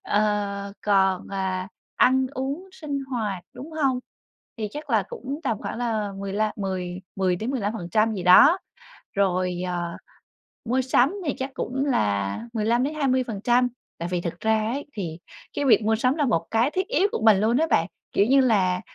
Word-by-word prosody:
Ờ, 205 -1 0
còn, 190 -2 +2
à, 190 -1 -2 0.3
ăn 260 +1 +4
uống 280 +9 -4
sinh 285 -5 -4
hoạt, 220 -8 -3
đúng 305 +5 -9
hông? 270 -5 +1 0.6
Thì 215 -1 -2
chắc 295 -1 -7
là 220 -3 +3
cũng 275 +5 -6
tầm 225 -5 0
khoảng - - -5
là 220 -4 -1
mười 195 -1 -4
lăm 215 +1 0
mười 185 -2 -3 0.2
mười 185 -2 +1
đến 220 +7 -3
15% 215 -2 0
gì 185 - -4
đó. 280 - +7 0.6
Rồi, 185 -2 0
ờ, 175 -1 -3 0.7
mua 250 +3 +1
sắm 260 +5 +3
thì 285 - 0
chắc 265 0 -3
cũng 265 +3 -2
là 100 - 0
15-20%, 245 0 +1 0.3
tại 170 +1 -3
vì 175 - 0
thực 170 0 -5
ra 220 0 +1
ấy 285 +2 -4
thì 175 - -5 0.4
cái 290 - -1
việc 240 -4 +5
mua 220 +1 +2
sắm 255 +3 +2
là 295 - +1
một 215 -10 +1
cái 230 +5 +2
thiết 375 +3 -1
yếu 415 -4 +2
của - - -2
mình 215 -3 +7
luôn 225 +3 +2
á 320 - +2
bạn, - - +3 0.3
kiểu 200 - +3
như 270 +3 +5
là, 190 -8 +2
220 Hz, 175 wpm, -25 LUFS, 190-260 Hz, 0.7 s, đó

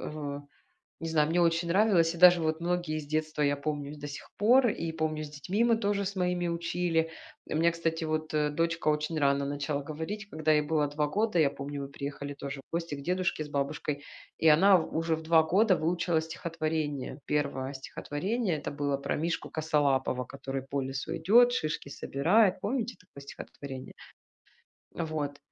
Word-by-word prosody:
в 145 -1 -6 0.6
не 165 - -3
знаю. 155 -1 +2
Мне 175 +2 +2
очень 170 0 +2
нравилось, 175 -3 +3
и - - -8
даже 180 -1 +8
вот 160 +1 -1
многие 175 -3 -1
из 145 -2 -6
детства 155 0 -1
я 145 -1 +2
помню 145 -1 -3
и - - -7
с - - -13
до 145 0 -6
сих 145 - -8
пор, 245 +5 +5
и 165 -6 -2
помню 155 -1 -2
с 150 - -7
детьми 180 +10 -1
мы 235 -1 +4
тоже 200 -2 0
с 200 +1 -4
моими 180 -1 0
учили. 170 -1 0 0.4
У - - -2
меня, 170 +2 +4
кстати, 165 -1 -2
вот, 155 0 -2
э, 150 -1 +2
дочка 165 +2 -1
очень 150 +2 0
рано 140 0 +2
начала 145 0 -2
говорить, 160 +8 -5
когда 155 -2 0
ей 150 -1 +4
было 150 -1 +1
2 150 +1 -1
года, 210 +3 0
я 150 -3 +5
помню 140 0 -6
мы - - -5
приехали 140 0 -6
тоже 140 -1 -6
в - - -49
гости 170 -2 -2
к 140 - -8
дедушке 180 -2 0
с 150 - -10
бабушкой, 145 0 -2 0.4
и 160 - +3
она 185 +6 +7
в 160 - -4
уже 165 0 +1
в 160 - -8
2 160 0 +5
года 190 +4 +4
выучила 170 0 +1
стихотворение. 155 -4 -3
1 140 -2 -1
стихотворение- 175 - -2
это - - -4
было 145 -1 -1
про 140 0 -2
мишку 165 +2 -2
косолапого, 140 -5 +1
который 135 +1 -5
по 135 +1 -2
лесу 135 +1 -4
идет, 235 +9 +6
шишки 155 - -2
собирает. 180 +10 +2
Помните 240 0 -2
такое 140 -6 -14
стихотворение? 135 -1 -9 1.0
Вот. 155 -4 -3
155 Hz, 190 wpm, -29 LUFS, 145-175 Hz, 1.0 s, даже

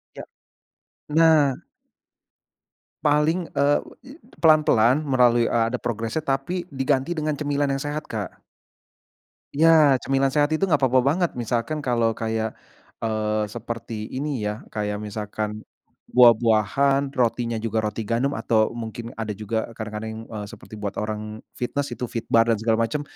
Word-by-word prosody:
Ya, - - -7 0.9
nah! 155 -3 +4 1.4
Paling, 155 +4 +2
eee, 145 +1 +2 0.6
pelan-pelan, 150 -4 +4
melalui, 125 -4 +3
eee, 115 - +2
ada - - 0
progresnya, 115 +5 -2
tapi 140 +6 -2
diganti 135 +2 0
dengan 155 -1 -1
cemilan 145 -1 -1
yang 135 - -4
sehat, 145 +1 -4
Kak. 105 -4 -5 1.1
Ya, 155 -3 +5
cemilan 135 +1 +1
sehat 145 -1 +3
itu 175 - +1
enggak 155 -7 +1
apa-apa 130 -1 +4
banget. 170 +5 +2
Misalkan 120 +5 -1
kalau 115 -3 +1
kayak, 110 -1 -2 0.5
eee, 110 -1 0
seperti 115 0 -6
ini 140 -2 -3
ya, 105 +1 -4
k 105 -1 -2
ayak 105 - -2
misalkan 105 0 -5 0.4
buah-buahan, 120 +4 +4
rotinya 120 -1 0
juga 110 0 -1
roti 110 +1 -3
gandum, 120 +6 0
atau 110 -1 +2
mungkin 115 0 -6
ada 110 -1 -3
juga 110 +2 -3
kadang-kadang, 110 +1 -6
eee, 105 -2 -6
seperti 110 +1 -11
buat 105 -1 -4
orang 105 0 -5 0.2
fitness. 140 +3 -2
Itu 125 - -3
Fitbar 115 -1 +1
dan 115 - +3
segala 110 0 +2
macem. 130 +6 -3
120 Hz, 135 wpm, -23 LUFS, 110-140 Hz, 1.4 s, Ya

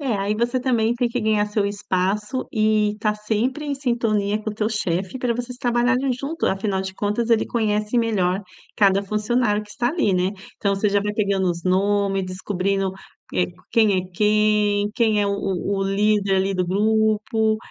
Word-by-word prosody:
É. 260 -7 -1
Aí 200 +2 -1
você 240 +3 0
também 235 -3 +1
tem 240 0 0
que 240 +1 -2
ganhar 215 -1 +2
seu 210 -1 0
espaço 205 +4 -2
e 215 -2 +2
estar 210 0 -1
sempre 225 +8 -1
em 285 - -2
sintonia 225 -6 0
com 215 - -4
o 210 - -8
teu 215 0 0
chefe 190 +1 -2
pra 245 -2 0
vocês 245 +1 -5
trabalharem 250 +2 +1
junto. 280 +6 -3
Afinal 195 0 0
de 190 0 -5
contas 210 +4 -1
ele 230 -1 +4
conhece 215 0 0
melhor 195 -5 +1 0.4
cada 195 -1 +4
funcionário 215 +1 0
que 205 - -15
está 240 +2 -1
ali, 280 - +1
né. 180 +1 +1 0.3
Então 200 -1 0
você 210 +2 +1
já 200 0 +2
vai 210 0 -2
pegando 200 -3 +1
os 170 0 -6
nome, 195 +1 +1
descobrindo, 190 +1 -2 0.4
eh, 180 - +2 0.3
quem 215 -4 +4
é - - -1
quem, 210 0 +2
quem 220 -3 +2
é 200 - +1
o 200 - 0
o 195 0 -2
líder 200 0 +2
ali 190 +1 +1
do 180 - 0
grupo, 220 +2 +1
210 Hz, 185 wpm, -22 LUFS, 195-230 Hz, 0.4 s, ele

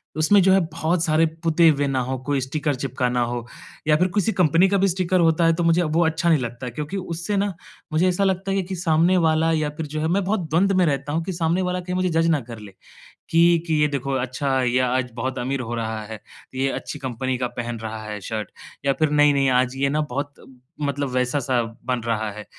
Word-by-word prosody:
उसमें 160 +6 +4
जो 190 - +4
है 195 - +5
बहुत 165 +1 0
सारे 160 -1 +3 0.2
पुते 165 0 +4
हुए 145 -2 +1
ना 135 -1 0
हो, 130 +1 -2
कोई 140 0 0
स्टिकर 145 +2 -2
चिपका 130 -1 -2
ना 125 0 0
हो 120 0 -4 0.4
या 155 - +5
फिर 180 +3 +2
किसी 205 +1 +2
कंपनी 175 +1 +4
का 200 - +2
भी 195 +1 +3
स्टिकर 185 0 0
होता 165 0 +3
है 165 - +4
तो 170 +1 -1
मुझे 170 +1 +3
वो 165 +1 +1
अच्छा 165 +2 +1
नहीं 160 -3 +4
लगता 120 0 -5
क्योंकि 150 - -5
उससे 175 +2 -3
ना 200 0 0 0.4
मुझे 165 +4 +3
ऐसा 180 +2 0
लगता 190 0 0
है 195 0 +1
कि 190 +1 -5
सामने 170 +1 +2
वाला 160 +1 +2
या 155 -2 0
फिर 160 - -3
जो 155 +1 -5
है 160 - 0
मैं 190 +4 +1
बहुत 185 -4 -2
द्वंद्व 190 +5 +2
में 185 - +4
रहता 140 -2 -1
हूँ 165 +1 0
कि 185 - -4
सामने 170 +1 0
वाला 180 0 -1
कहीं 180 0 -4
मुझे 185 0 +1
जज 165 0 +2
ना 160 -3 +3
कर 115 -1 -10
ले। 105 -2 -11 0.6
कि, 170 0 +4
कि 160 - 0
ये 150 - +4
देखो 140 -2 -3
अच्छा 130 +1 -1
या 125 +1 +2
आज 130 -1 -1
बहुत 130 +3 -3
अमीर 130 +2 -2
हो 120 -1 -4
रहा 110 -1 -3
है 110 0 -8 0.4
ये 135 +1 0
अच्छी 150 - -6
कंपनी 130 0 -3
का 125 0 -1
पहन 120 -1 -4
रहा 110 0 -6
है 105 -1 -5
शर्ट 110 +2 -5 0.3
या 140 - +3
फिर 155 -1 +3
नहीं-नहीं 145 -2 +4
आज 125 0 +1
ये 140 +1 +1
ना 150 +2 0
बहुत 145 +1 -4 0.5
मतलब 140 -1 -1
वैसा 125 +2 0
सा 125 -2 0 0.2
बन 125 -1 -1
रहा 110 -2 -1
है। 105 +1 -9
150 Hz, 240 wpm, -23 LUFS, 130-170 Hz, 0.6 s, है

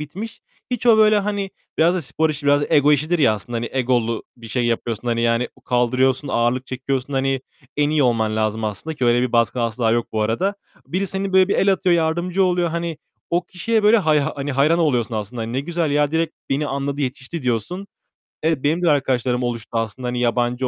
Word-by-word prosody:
bitmiş. 195 +10 -7 0.3
Hiç 245 0 -2
o, 225 -2 +7
böyle, 215 -1 +5
hani, 200 -1 -2 0.3
biraz 170 +3 +4
da 180 - -1
spor 155 +3 0
işi, 145 -1 -5
biraz 145 0 +4
ego 150 -1 +5
işidir 155 +4 +1
ya 120 -7 +4
aslında. 115 +3 -6
Hani, 115 0 -3
egolu 120 -3 0
bir 115 -1 -11
şey 120 +2 0
yapıyorsun. 120 0 -2
Hani, 115 0 0
yani, 115 +1 +1
u - - -21
kaldırıyorsun, 130 +3 +1
ağırlık 120 +2 0
çekiyorsun, 130 +1 -3
hani, 135 0 0 0.4
en 150 0 +2
iyi 155 -2 +2
olman 110 -3 +1
lazım 110 0 -1
aslında 110 +10 -4
ki 130 - -2
öyle 120 0 +3
bir 125 - -1
baskı 115 +1 +2
asla 115 0 0
yok 120 0 +1
bu 110 - 0
arada. 175 - 0 0.3
Biri 190 +3 -1
seni, 195 +1 -3
böyle, 190 0 +5
bir - - +1
el 195 0 +3
atıyor, 185 -1 +2
yardımcı 170 +4 +1
oluyor. 180 -2 +1
Hani, 170 -1 -3 0.3
o 175 +1 +1
kişiye, 220 +5 -1
böyle, 210 +2 +6
hay 155 -5 +3
hani, 140 0 -3
hayran 150 +5 +3
oluyorsun 125 -9 +1
aslında. 110 +2 -4
Hani, 115 +1 -5
"Ne 130 - 0
güzel 165 0 -2
ya, 145 0 +2
direkt 160 0 -1 0.2
beni 140 +2 0
anladı, 140 +1 -3
yetişti." 135 +3 -4
diyorsun. 125 - -2 0.6
Evet, 160 -4 0
benim 160 +5 +1
de 170 - +4
arkadaşlarım 130 -3 +1
oluştu 120 -2 -3
aslında. 115 +2 -3
Hani, 125 0 -2
yabancı 120 +1 0
135 Hz, 210 wpm, -21 LUFS, 120-170 Hz, 0.6 s, o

